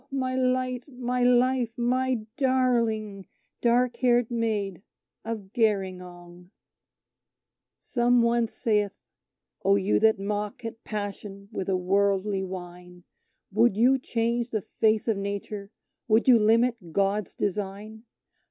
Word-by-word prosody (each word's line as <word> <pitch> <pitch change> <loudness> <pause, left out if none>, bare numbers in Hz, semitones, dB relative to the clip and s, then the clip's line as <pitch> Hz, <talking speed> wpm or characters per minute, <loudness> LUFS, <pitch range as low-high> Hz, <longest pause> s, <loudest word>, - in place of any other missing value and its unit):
my 260 -2 -2
light, 255 -1 0
my 250 -2 -3
life, 245 -1 +2
my 250 -1 0
darling 230 -7 0 0.3
dark 240 0 +2
haired 245 -2 +2
Maid 210 -6 -2 0.4
of 215 -4 -6
Gerringong...... 180 -5 -2 1.3
Some 240 -1 +2
one 235 0 +2
saith, 210 -2 0 0.7
"Oh, 195 +1 +4
you 200 0 +2
that 220 0 +4
mock 210 +5 -4
at 225 0 -7
Passion 200 -1 -6
with 195 -3 -4
a 190 - +2
worldly 195 +1 +1
whine, 180 -1 -9 0.5
Would 220 0 +3
you 255 +4 +4
change 235 -1 -1
the 215 -4 -2 0.2
face 220 0 +3
of 220 -3 +1
Nature 200 0 -5 0.4
would 220 +2 +3
you 245 -3 +7
limit 225 -3 +2
God's 200 +1 0
design? 205 +3 -4
220 Hz, 115 wpm, -26 LUFS, 200-240 Hz, 1.3 s, you